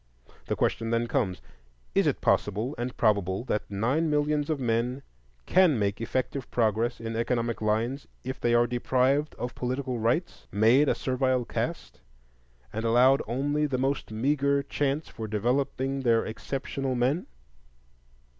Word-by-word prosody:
The -, -, 0 dB
question 115 Hz, 0 st, 0 dB
then 115 Hz, +1 st, +1 dB
comes: 105 Hz, -, -1 dB, 0.5 s
Is -, -, +3 dB
it -, -, 0 dB
possible, 105 Hz, +7 st, +1 dB
and 120 Hz, +1 st, -4 dB
probable, 100 Hz, -2 st, +1 dB
that 105 Hz, -4 st, -2 dB
nine 125 Hz, +11 st, 0 dB
millions 150 Hz, 0 st, +1 dB
of 155 Hz, -3 st, 0 dB
men 120 Hz, +2 st, -1 dB, 0.4 s
can 180 Hz, -8 st, +4 dB
make 100 Hz, 0 st, -1 dB
effective 130 Hz, +3 st, -2 dB
progress 115 Hz, +1 st, +1 dB
in 115 Hz, 0 st, -4 dB
economic 115 Hz, 0 st, -1 dB
lines 115 Hz, +6 st, -1 dB, 0.2 s
if 130 Hz, +1 st, -5 dB
they 120 Hz, 0 st, +2 dB
are 120 Hz, 0 st, +5 dB
deprived 130 Hz, +4 st, +1 dB
of 120 Hz, 0 st, -4 dB
political 130 Hz, 0 st, -3 dB
rights, 125 Hz, +11 st, -1 dB
made 115 Hz, +8 st, +4 dB
a -, -, +2 dB
servile 130 Hz, -1 st, 0 dB
caste, 65 Hz, -, -4 dB, 0.7 s
and 110 Hz, -, -3 dB
allowed 125 Hz, +4 st, +5 dB
only 145 Hz, +5 st, 0 dB
the 135 Hz, -3 st, -1 dB
most 135 Hz, +2 st, -1 dB
meagre 140 Hz, +4 st, +1 dB
chance 145 Hz, +2 st, -1 dB
for 110 Hz, -, -7 dB
developing 130 Hz, +5 st, 0 dB
their 115 Hz, -3 st, +2 dB
exceptional 135 Hz, +3 st, -3 dB
men? 130 Hz, +8 st, 0 dB
125 Hz, 145 wpm, -27 LUFS, 115-140 Hz, 0.7 s, are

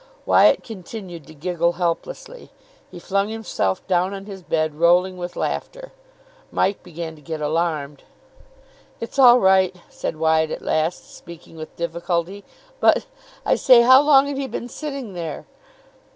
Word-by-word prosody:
Wyatt -, -, +4 dB
continued 185 Hz, -, -9 dB
to 155 Hz, -, -14 dB
giggle 170 Hz, +2 st, -1 dB
helplessly. 185 Hz, -, -4 dB, 0.4 s
He -, -, -11 dB
flung 195 Hz, +3 st, -1 dB
himself 220 Hz, -, -2 dB
down 185 Hz, +1 st, 0 dB
on 195 Hz, 0 st, -9 dB
his 195 Hz, -2 st, -9 dB
bed, 155 Hz, -3 st, -1 dB
rolling 175 Hz, +4 st, +3 dB
with 175 Hz, -1 st, -7 dB
laughter. -, -, -4 dB, 0.6 s
Mike 200 Hz, +1 st, 0 dB
began 165 Hz, -2 st, -7 dB
to -, -, -17 dB
get 160 Hz, +2 st, -6 dB
alarmed. 150 Hz, -2 st, -2 dB, 1.0 s
"It's 230 Hz, +4 st, -6 dB
all 250 Hz, -2 st, +8 dB
right," 190 Hz, -2 st, +3 dB
said -, -, -5 dB
Wyatt 160 Hz, 0 st, +2 dB
at -, -, -6 dB
last, 160 Hz, +3 st, -2 dB
speaking 170 Hz, -1 st, -13 dB
with 155 Hz, -1 st, -10 dB
difficulty. 170 Hz, +3 st, -3 dB, 0.4 s
"But, -, -, +3 dB, 0.4 s
I -, -, +3 dB
say, 245 Hz, -2 st, +6 dB
how 260 Hz, +2 st, +7 dB
long 285 Hz, -2 st, +5 dB
had 285 Hz, -1 st, -4 dB
he 275 Hz, -, -3 dB
been 240 Hz, 0 st, -6 dB
sitting 275 Hz, -7 st, -6 dB
there?" 165 Hz, -4 st, -6 dB
180 Hz, 150 wpm, -21 LUFS, 165-225 Hz, 1.0 s, all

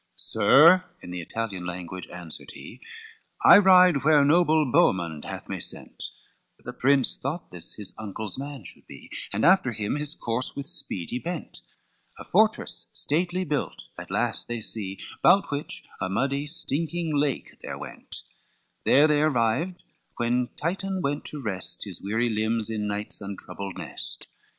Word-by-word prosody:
XXVIII -, -, -2 dB, 0.2 s
"Sir," 170 Hz, -, +7 dB, 0.2 s
in 90 Hz, -, -8 dB
the 90 Hz, -1 st, -4 dB
Italian 100 Hz, 0 st, -4 dB
language 90 Hz, 0 st, -6 dB
answered 85 Hz, -3 st, -8 dB
he, -, -, -11 dB, 0.6 s
"I -, -, +10 dB
ride 180 Hz, -7 st, +6 dB
where 150 Hz, -1 st, +5 dB
noble 155 Hz, 0 st, +4 dB
Boemond 85 Hz, -, +2 dB
hath -, -, -6 dB
me -, -, -4 dB
sent:" -, -, -3 dB, 0.5 s
The 125 Hz, -, -9 dB
prince 135 Hz, +1 st, +3 dB
thought 150 Hz, +6 st, -5 dB
this 90 Hz, -2 st, -3 dB
his 100 Hz, -4 st, -3 dB
uncle's 105 Hz, -1 st, -4 dB
man 140 Hz, -2 st, -7 dB
should -, -, -5 dB
be, -, -, -11 dB, 0.2 s
And 105 Hz, +6 st, 0 dB
after 170 Hz, -9 st, +4 dB
him 105 Hz, +5 st, -2 dB
his 150 Hz, +2 st, -2 dB
course 120 Hz, -1 st, -2 dB
with 140 Hz, -, -4 dB
speed 90 Hz, -, -1 dB
he 125 Hz, -, -2 dB
bent, 170 Hz, +2 st, -6 dB, 0.6 s
A -, -, -8 dB
fortress -, -, +2 dB
stately 175 Hz, +4 st, 0 dB
built 150 Hz, -4 st, -2 dB, 0.2 s
at -, -, -9 dB
last -, -, -1 dB
they 120 Hz, -1 st, -3 dB
see, 100 Hz, -3 st, -2 dB, 0.2 s
Bout 195 Hz, -4 st, +5 dB
which 145 Hz, +1 st, -4 dB, 0.2 s
a 95 Hz, -, -1 dB
muddy 140 Hz, +8 st, -1 dB
stinking 160 Hz, +1 st, -1 dB
lake 145 Hz, -1 st, -1 dB
there -, -, -6 dB
went, -, -, -9 dB, 0.6 s
There 145 Hz, +3 st, +6 dB
they 150 Hz, -1 st, +3 dB
arrived 150 Hz, +5 st, +1 dB, 0.3 s
when 120 Hz, +1 st, +1 dB
Titan 190 Hz, +3 st, -2 dB
went 145 Hz, +1 st, -1 dB
to 150 Hz, -, -3 dB
rest 95 Hz, -5 st, -2 dB
His -, -, -5 dB
weary 110 Hz, +4 st, 0 dB
limbs 110 Hz, +1 st, 0 dB
in 105 Hz, -1 st, -2 dB
night's 105 Hz, +1 st, -3 dB
untroubled 100 Hz, -1 st, -6 dB
nest. -, -, -6 dB
130 Hz, 160 wpm, -26 LUFS, 105-155 Hz, 0.6 s, I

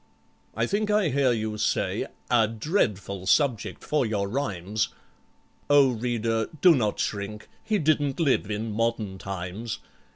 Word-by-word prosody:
I -, -, +2 dB
think 210 Hz, +1 st, -1 dB
I 210 Hz, -5 st, +3 dB
hear 135 Hz, -1 st, +2 dB
you 110 Hz, -2 st, -2 dB
say, -, -, 0 dB, 0.2 s
"A 115 Hz, -3 st, +5 dB
dreadful 105 Hz, -, -1 dB
subject 125 Hz, -1 st, +1 dB
for 150 Hz, -2 st, +1 dB
your 105 Hz, -4 st, -1 dB
rhymes!" 105 Hz, -4 st, -1 dB, 0.8 s
O 145 Hz, -2 st, +6 dB
reader, 115 Hz, -1 st, -1 dB
do 180 Hz, -2 st, +7 dB
not 110 Hz, -8 st, 0 dB
shrink—he 105 Hz, -, -3 dB
didn't 150 Hz, -4 st, +1 dB
live 140 Hz, -, +2 dB
in 110 Hz, +1 st, -3 dB
modern 110 Hz, -3 st, -1 dB
times! 100 Hz, +4 st, -5 dB
115 Hz, 130 wpm, -26 LUFS, 105-140 Hz, 0.8 s, do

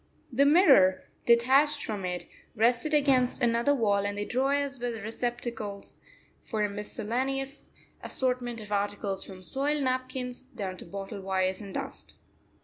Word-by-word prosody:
The 280 Hz, +4 st, +4 dB
mirror, 270 Hz, -, +6 dB, 0.2 s
detached 270 Hz, +5 st, +4 dB
from 205 Hz, -4 st, -3 dB
it, 180 Hz, -1 st, -3 dB, 0.3 s
rested 240 Hz, +6 st, +2 dB
against 275 Hz, -4 st, +3 dB
another 235 Hz, +3 st, +3 dB
wall, 205 Hz, -5 st, +2 dB
and 205 Hz, 0 st, -2 dB
the 205 Hz, -, -2 dB
drawers 275 Hz, +2 st, 0 dB
were 245 Hz, 0 st, -1 dB
receptacles 225 Hz, -2 st, -5 dB, 0.4 s
for 215 Hz, -2 st, -2 dB
a 210 Hz, -, +1 dB
miscellaneous 250 Hz, +7 st, -3 dB, 0.3 s
assortment 250 Hz, -2 st, -1 dB
of 210 Hz, -1 st, -10 dB
articles 200 Hz, -1 st, -1 dB
from 185 Hz, -2 st, -11 dB
soiled 280 Hz, -, 0 dB
napkins 255 Hz, -1 st, -2 dB
down 200 Hz, -8 st, -6 dB
to -, -, -9 dB
bottle 195 Hz, +3 st, -6 dB
wires 190 Hz, 0 st, 0 dB
and 200 Hz, -2 st, -8 dB
dust. -, -, -6 dB
235 Hz, 140 wpm, -29 LUFS, 205-265 Hz, 0.4 s, mirror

